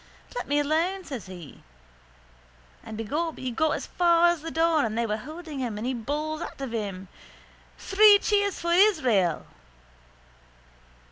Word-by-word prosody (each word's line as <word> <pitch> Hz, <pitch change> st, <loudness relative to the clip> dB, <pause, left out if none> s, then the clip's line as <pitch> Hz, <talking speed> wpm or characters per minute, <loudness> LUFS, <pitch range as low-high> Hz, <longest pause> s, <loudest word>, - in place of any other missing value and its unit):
—Let -, -, -4 dB
me 290 Hz, -, +1 dB
alone, 330 Hz, +6 st, 0 dB
says 265 Hz, -, -7 dB
he. 175 Hz, -6 st, -11 dB, 1.2 s
And 220 Hz, -, -8 dB
begob 300 Hz, +9 st, -3 dB
he 260 Hz, -1 st, -4 dB
got 315 Hz, +6 st, +1 dB
as -, -, -5 dB
far 345 Hz, -1 st, +3 dB
as 345 Hz, -3 st, -1 dB
the 330 Hz, -, -6 dB
door 325 Hz, -1 st, +2 dB
and 220 Hz, -1 st, -2 dB
they 235 Hz, -, +1 dB
holding 290 Hz, +8 st, -6 dB
him 235 Hz, -5 st, -3 dB
and 215 Hz, -, -4 dB
he 260 Hz, -, -1 dB
bawls 300 Hz, +6 st, -3 dB
out -, -, -7 dB
of 270 Hz, -3 st, -5 dB
him: 195 Hz, -4 st, -4 dB, 0.7 s
—Three 410 Hz, +1 st, +6 dB
cheers 405 Hz, -1 st, 0 dB
for 340 Hz, 0 st, -1 dB
Israel! 260 Hz, -, +3 dB
300 Hz, 150 wpm, -26 LUFS, 225-340 Hz, 1.2 s, Three